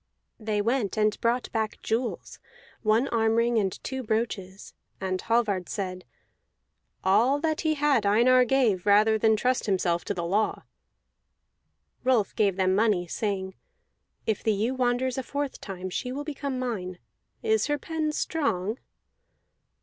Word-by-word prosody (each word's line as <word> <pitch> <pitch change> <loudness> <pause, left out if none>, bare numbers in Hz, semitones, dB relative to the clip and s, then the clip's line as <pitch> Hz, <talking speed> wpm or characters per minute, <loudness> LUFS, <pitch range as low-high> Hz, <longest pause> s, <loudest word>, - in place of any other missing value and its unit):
'" - - -51
They 210 -1 +1
went 230 -3 0
and 215 -1 +1
brought 240 +2 0
back 220 -1 -2
jewels, 230 +2 -3 0.4
one 220 +4 +2
arm 225 -1 +2
ring 230 0 +2
and 195 -2 0
two 265 0 -4
brooches; 215 -4 -3 0.3
and 185 -1 -2
Hallvard 215 -6 0
said, 185 -2 -4 1.0
"All 230 +9 +3
that 315 -1 0
he 310 -1 +1
had 285 -6 +2
Einar 240 +5 +5
gave, 230 -8 +1
rather 215 +2 +5
than 220 0 +4
trust 250 +3 0
himself 180 -3 +1
to 205 - -2
the 170 -1 -3
law." 205 +5 0 1.4
Rolf 250 -6 +2
gave 200 -3 +2
them 185 -1 +2
money, 205 -3 +2
saying: 190 +1 -3 0.7
"If 220 -2 -1
the 220 - +2
ewe 220 +5 0
wanders 255 0 0
a - - 0
fourth 285 +2 -4
time, 185 -2 -6
she 250 - -3
will 285 +3 -4
become 280 -3 -4
mine. 200 -8 -3 0.5
Is 440 -1 +2
her 295 0 +1
pen 310 +1 -2
strong?" 225 - -1
220 Hz, 150 wpm, -27 LUFS, 200-255 Hz, 1.4 s, Einar